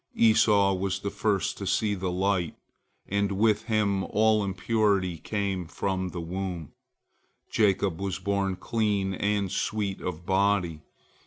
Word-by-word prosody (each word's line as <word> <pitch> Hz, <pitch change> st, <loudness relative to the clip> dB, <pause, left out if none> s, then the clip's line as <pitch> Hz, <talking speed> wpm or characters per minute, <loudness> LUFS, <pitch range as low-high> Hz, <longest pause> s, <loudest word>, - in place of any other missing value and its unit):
Esau 105 Hz, -3 st, +4 dB
was 95 Hz, +1 st, -2 dB
the 100 Hz, -, -3 dB
first 100 Hz, -2 st, -1 dB
to 100 Hz, -, -4 dB
see 105 Hz, +1 st, +1 dB
the 95 Hz, -2 st, -2 dB
light, 90 Hz, -2 st, 0 dB, 0.5 s
and 100 Hz, 0 st, 0 dB
with 105 Hz, +2 st, +2 dB
him 105 Hz, -4 st, +1 dB
all 110 Hz, 0 st, +3 dB
impurity 100 Hz, -3 st, 0 dB
came 100 Hz, -3 st, -2 dB
from 95 Hz, +1 st, -2 dB
the 90 Hz, -, -6 dB
womb; 85 Hz, -2 st, -4 dB, 0.8 s
Jacob 95 Hz, -4 st, +1 dB
was 95 Hz, -2 st, -2 dB
born 100 Hz, 0 st, -1 dB
clean 100 Hz, -3 st, 0 dB
and 100 Hz, -1 st, 0 dB
sweet 105 Hz, -3 st, -2 dB
of 85 Hz, -1 st, -5 dB
body. 95 Hz, -4 st, +1 dB
100 Hz, 135 wpm, -27 LUFS, 95-105 Hz, 0.8 s, Esau